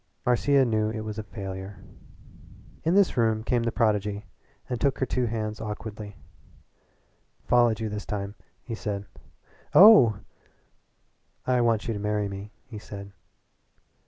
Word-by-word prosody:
Marcia 135 +3 +3
knew 110 -2 +1
it 110 0 -4
was 110 0 -5
a - - -4
failure. 95 -2 -7 1.1
Into 170 +4 +2
this 200 -8 +3
room 110 -2 +2
came 120 0 +1
the 115 0 -1
prodigy 105 -2 0 0.4
and 125 -4 -4
took 140 0 +2
her 130 - 0
two 125 0 -1
hands 110 -1 -3
awkwardly. 105 -1 -6
"I - - -31
followed 120 -3 +3
you 110 - -2
this 105 0 -6
time," 100 -1 -4 0.3
he 120 - -6
said. 100 -2 -4 0.7
"Oh!" 185 - +8 1.3
"I 125 -1 +2
want 115 -2 +1
you 115 - -1
to 105 - -4
marry 105 0 -1
me," 100 +1 -8
he 115 -5 -9
said. 100 -1 -9
110 Hz, 145 wpm, -26 LUFS, 105-120 Hz, 1.3 s, Oh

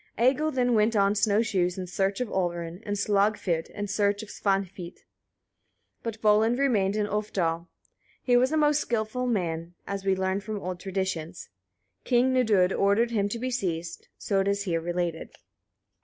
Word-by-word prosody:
Egil 270 +6 +3
then 250 -4 +1
went 220 +1 +3
on 200 0 +3
snow 210 +1 +2
shoes 185 -5 0
in 185 - -4
search 195 +3 -1
of 250 - -1
Olrun, 175 -2 -3
and 205 - -1
Slagfid 200 -4 +1
in 205 - -5
search 205 +1 0
of 215 - -11
Svanhvit, 195 -3 -2 1.0
but 225 -2 -5
Volund 220 +3 +4
remained 215 -8 +2
in 210 -1 +1
Ulfdal. 180 -5 -2 0.6
He 245 - +3
was 255 +3 +4
a 315 - +1
most 295 -1 +3
skilful 235 +2 -2
man, 170 -6 -2
as 200 -1 -4
we 195 -1 +2
learn 190 +1 0
from 210 +1 -5
old 180 -1 -5
traditions. 185 -4 -4 0.5
King 255 +1 +3
Nidud 210 -7 +3
ordered 205 +4 +2
him 205 -3 0
to 235 - -3
be 255 +2 -3
seized, 175 -8 -3
so 200 - -1
as - - +4
it 195 - -1
is 200 0 0
here 170 -4 -1
related. 175 -1 -3
200 Hz, 170 wpm, -27 LUFS, 185-225 Hz, 1.0 s, Volund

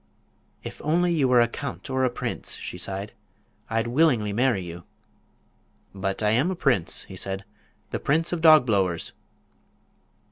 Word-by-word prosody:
"If - - -8
only 175 +3 +2
you 145 -5 +2
were 125 -1 +5
a 120 - +4
count 130 +3 -6
or 130 0 0
a 130 - +3
prince," 120 - -4
she - - -7
sighed, 95 +3 -4 0.6
"I'd 115 +1 0
willingly 120 -5 +2
marry 120 -4 +1
you." 85 0 -8 1.1
"But 95 +1 -3
I 105 - +3
am 130 +10 +2
a 190 - -2
prince," 125 - +1
he - - -12
answered; 95 +1 -3 0.5
"the - - -2
Prince 160 +4 +1
of 170 - -2
Dogblowers." 110 - +4
120 Hz, 150 wpm, -25 LUFS, 100-145 Hz, 1.1 s, were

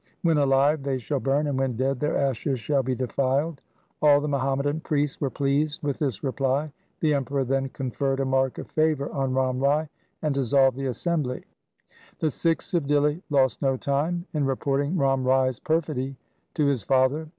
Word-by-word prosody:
When 165 -3 +3
alive 140 +2 +3
they 135 -1 -1
shall 135 +3 -2
burn, 140 +3 +1
and 140 -3 -1
when 135 -3 0
dead 135 +1 0
their 150 - 0
ashes 135 -1 -1
shall 140 +3 +1
be 130 0 -2
defiled.' 135 +4 -1 0.4
All 145 -1 +6
the 150 - -3
Muhammadan 140 +1 0
priests 145 -2 -1
were 140 - +1
pleased 145 +3 -1
with 140 -2 -2
this 130 -9 -2
reply. 135 +2 0 0.3
The 155 -2 +3
Emperor 140 0 0
then 135 +1 -1
conferred 135 +1 -2
a 135 - +1
mark 130 -1 +1
of - - -6
favour 155 -3 +1
on 135 -2 -1
Ram 130 -1 +1
Rai 145 +3 +1 0.3
and 150 -2 +1
dissolved 135 -1 +3
the 135 0 -3
assembly. 130 0 -2 0.7
The 155 - 0
Sikhs 165 +6 -1
of 170 -5 +1
Dihli 145 +3 +2
lost 135 -5 +2
no 135 -1 +1
time 155 +7 -1
in 150 -2 0
reporting 140 +4 0
Ram 135 -3 +2
Rai's 130 -1 +2
perfidy 155 -5 -1 0.4
to 150 - +2
his 140 -4 +1
father. 135 +7 +2
140 Hz, 180 wpm, -25 LUFS, 130-150 Hz, 0.7 s, All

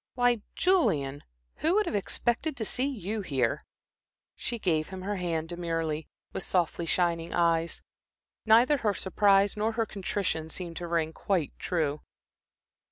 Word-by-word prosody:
Why, 245 -3 +3
Julian, 145 - +2 0.4
who 325 +4 +2
would 425 0 +3
have - - -3
expected 240 +8 0
to 220 - -2
see 255 +5 0
you 220 -5 -3
here?" 140 - -1 0.7
She 240 - -4
gave 160 -7 +1
him 185 -1 -7
her 205 +1 -2
hand 165 -3 -2
demurely, 165 -3 -2 0.3
with - - -3
softly 175 -2 0
shining 170 -1 0
eyes. 170 -1 +1 0.6
Neither 235 +7 +5
her 210 -6 0
surprise 200 +1 +3
nor 215 +2 0
her 225 0 +1
contrition 190 -6 -2
seemed 170 0 -6
to 175 - -4
ring 165 -1 0
quite 175 -6 -1
true. 155 -4 -1
185 Hz, 145 wpm, -29 LUFS, 165-220 Hz, 0.7 s, Neither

